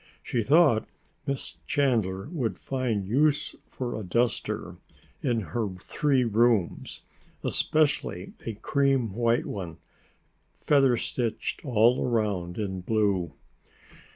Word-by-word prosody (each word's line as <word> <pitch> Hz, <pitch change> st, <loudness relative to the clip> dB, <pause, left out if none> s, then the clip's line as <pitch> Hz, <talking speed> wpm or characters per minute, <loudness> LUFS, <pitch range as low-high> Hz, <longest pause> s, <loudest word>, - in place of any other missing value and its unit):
She 120 Hz, -, -1 dB
thought 140 Hz, -2 st, +4 dB, 0.4 s
Miss 140 Hz, -1 st, -4 dB
Chandler 115 Hz, -9 st, +1 dB
would 130 Hz, -10 st, -2 dB
find 125 Hz, -7 st, -2 dB
use 145 Hz, +6 st, +2 dB
for 125 Hz, -2 st, -4 dB
a 110 Hz, -, -4 dB
duster 115 Hz, +5 st, -1 dB, 0.4 s
in 115 Hz, -2 st, +1 dB
her 110 Hz, +1 st, -2 dB
three 130 Hz, +8 st, +1 dB
rooms, 115 Hz, -4 st, +1 dB, 0.4 s
especially 140 Hz, -, 0 dB
a 115 Hz, -, -3 dB
cream 135 Hz, -2 st, +1 dB
white 115 Hz, +2 st, +1 dB
one, 90 Hz, -5 st, -5 dB, 0.8 s
feather 135 Hz, -4 st, +4 dB
stitched 115 Hz, 0 st, -3 dB
all 120 Hz, -2 st, +3 dB
around 100 Hz, -7 st, -1 dB
in 95 Hz, -3 st, -3 dB
blue. 95 Hz, -6 st, 0 dB
115 Hz, 105 wpm, -27 LUFS, 100-135 Hz, 0.8 s, thought